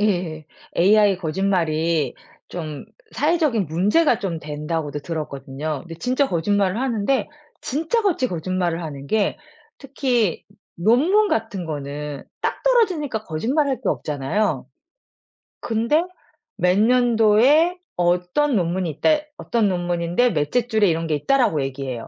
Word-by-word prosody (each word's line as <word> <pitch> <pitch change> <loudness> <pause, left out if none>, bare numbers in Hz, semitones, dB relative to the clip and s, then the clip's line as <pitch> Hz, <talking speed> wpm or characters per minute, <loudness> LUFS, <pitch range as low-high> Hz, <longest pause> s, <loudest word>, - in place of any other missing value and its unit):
예. 175 -7 -1 0.3
AI 205 +2 +5
거짓말이 165 -3 0 0.3
좀 155 -3 -6 0.3
사회적인 295 - +1
문제가 210 - +2
좀 175 -4 -3
된다고도 150 0 -4
들었거든요. 145 -2 -5
근데 165 +2 -9
진짜 255 - 0
거짓말을 195 +4 +1
하는데 260 +1 0 0.3
진짜 325 - -1
같이 335 -11 +1
거짓말을 175 0 -2
하는 140 -3 -7
게 215 - 0 0.4
특히 255 - -1 0.3
논문 300 - +3
같은 220 -5 -2
거는 145 -2 -5 0.2
딱 - - -2
떨어지니까 360 - +1
거짓말할 260 - 0
게 - - -2
없잖아요. 145 +2 -1 0.9
근데 235 +8 +1 0.5
"몇 180 +1 +2
년도에 245 - +4 0.2
어떤 180 +11 +1
논문이 180 -1 0
있다." 150 - +1 0.3
"어떤 230 -3 0
논문인데 175 +5 0
몇째 180 +11 0
줄에 220 -4 +3
이런 165 0 -1
게 155 - +1
있다."라고 200 - +2
얘기해요. 130 -3 -5
190 Hz, 285 characters per minute, -22 LUFS, 160-245 Hz, 0.9 s, AI